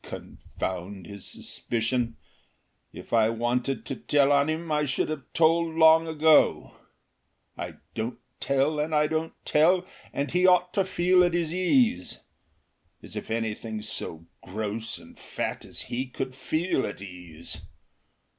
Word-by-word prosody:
Confound 95 +1 -6
his 100 0 -9
suspicion! 115 0 -2 0.7
If - - -10
I 110 -1 +5
wanted 120 +3 -1
to 135 - -4
tell 145 0 +3
on 140 +1 +4
him 160 +1 -2
I 150 0 +2
should 135 0 0
have 155 -4 -5
told 165 0 +3
long 160 0 +6
ago. 160 -1 +4 0.8
I - - -6 0.2
don't 110 +3 -3 0.2
tell 140 +3 +1
and 155 +1 0
I 150 0 +4
don't 160 +1 -1
tell, 175 +4 +4 0.3
and 140 +1 -2
he 180 +1 +4
ought 180 -1 +4
to 195 - +2
feel 180 0 +4
at 175 -1 +2
his 170 -2 0
ease. 185 - +2 0.8
As - - -9
if - - -5
anything 110 -1 -3
so 85 -6 -4 0.2
gross 110 +3 -4
and - - -15
fat - - -4
as - - -7
he 130 +2 -3
could 130 +1 -4
feel 155 +3 0
at 105 - -7
ease! 90 -5 -8
140 Hz, 145 wpm, -27 LUFS, 115-160 Hz, 0.8 s, long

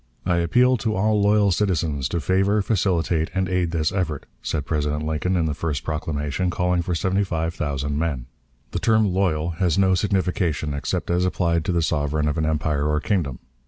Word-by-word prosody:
"I 90 - +2
appeal 125 +10 +3
to 110 -1 -1
all 105 +2 +2
loyal 105 0 +4
citizens 80 -8 0
to 85 - -1
favor, 95 +6 +2
facilitate, 90 -6 +1
and 95 -1 +1
aid 90 -2 0
this 80 -2 0
effort," 85 -7 -2 0.2
said 75 -3 -2
President 75 0 -1
Lincoln, 80 +4 0
in 85 - +1
the 75 - -1
first 70 -2 -3
proclamation, 75 +2 -2
calling 90 0 +1
for 85 0 -2
seventy 95 +3 +1
five 80 -3 -2
thousand 70 -1 -2
men. 75 -7 -2 0.5
The - - -2
term 110 -4 +2
"loyal" 85 -4 +1
has 90 -4 +2
no 95 -1 +4
signification 90 -6 0
except 70 +4 -2
as 90 +1 +2
applied 85 -3 +1
to - - 0
the 85 -1 +1
sovereign 75 -1 0
of 75 +2 -1
an 80 - +1
empire 75 -2 0
or 75 0 +1
kingdom. 80 - -1
85 Hz, 190 wpm, -23 LUFS, 75-95 Hz, 0.5 s, loyal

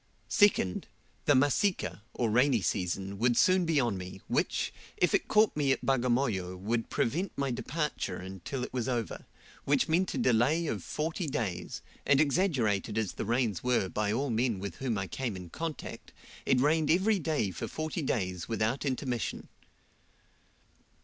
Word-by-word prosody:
Second, 200 - +3 0.4
the 145 - +5
Masika, 145 - +1
or 115 -3 0
rainy 125 0 +4
season, 95 +3 -2
would 120 +1 +3
soon 185 -1 +4
be 160 -3 +3
on 115 -7 0
me, 90 +1 -8
which, - - 0 0.2
if - - +2
it - - +2
caught 215 0 +4
me 145 -2 +2
at - - 0
Bagamoyo, 120 -8 +1
would 115 +5 -2
prevent 175 +11 0
my 140 -1 0
departure 150 +5 -2
until 95 +8 -5
it - - -6
was 125 0 -1
over, 120 -3 -3 0.4
which - - +2
meant 175 +4 +1
a - - -1
delay 130 +8 +3
of - - -3
forty 160 +3 -2
days, 105 -10 -3 0.2
and 140 -1 +4
exaggerated 130 - +1
as 110 -4 0
the - - -4
rains 115 -4 0
were 125 -7 +2
by 105 +1 -1
all 130 +4 0
men 115 -1 +1
with 100 -1 -6
whom 125 -5 -1
I 100 - -1
came 115 +4 -3
in 90 -2 -9
contact, 165 -1 -6 0.3
it 130 - +4
rained 150 +3 +2
every 195 +4 +3
day 150 - 0
for 85 - -5
forty 155 +2 -3
days 90 - -2
without 115 +4 0
intermission. 130 -3 -2
125 Hz, 165 wpm, -30 LUFS, 105-150 Hz, 0.4 s, the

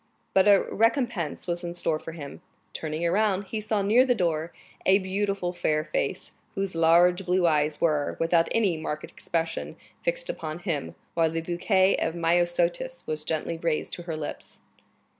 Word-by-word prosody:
But 190 +1 +5
a 200 -1 +6
recompense 230 - 0
was 175 0 -2
in 170 0 -4
store 165 -3 0
for 165 - -8
him; 145 -4 -9 0.3
turning 155 +1 -3
around, 200 +2 +2
he 215 +2 -4
saw 215 -1 0
near 225 +6 +5
the 250 -2 +2
door 165 -4 -1 0.3
a 190 +1 +5
beautiful 195 -1 -1
fair 155 -3 0
face, - - -2 0.2
whose 195 -1 -2
large 170 +3 +4
blue 180 0 +2
eyes 150 -2 +2
were, 150 -3 +1
without 165 0 +3
any 200 -7 +2
marked 155 -1 -4
expression, 165 -1 -3 0.3
fixed - - -1
upon 155 -1 -4
him, 170 -6 -3 0.2
while 165 -1 +2
the 165 +1 -2
bouquet 185 +3 +2
of 160 - -1
myosotis 175 +8 0
was 155 -1 -2
gently 160 +1 -2
raised 165 -2 -1
to - - -5
her 160 - -2
lips. 150 - -7
175 Hz, 165 wpm, -26 LUFS, 160-195 Hz, 0.3 s, a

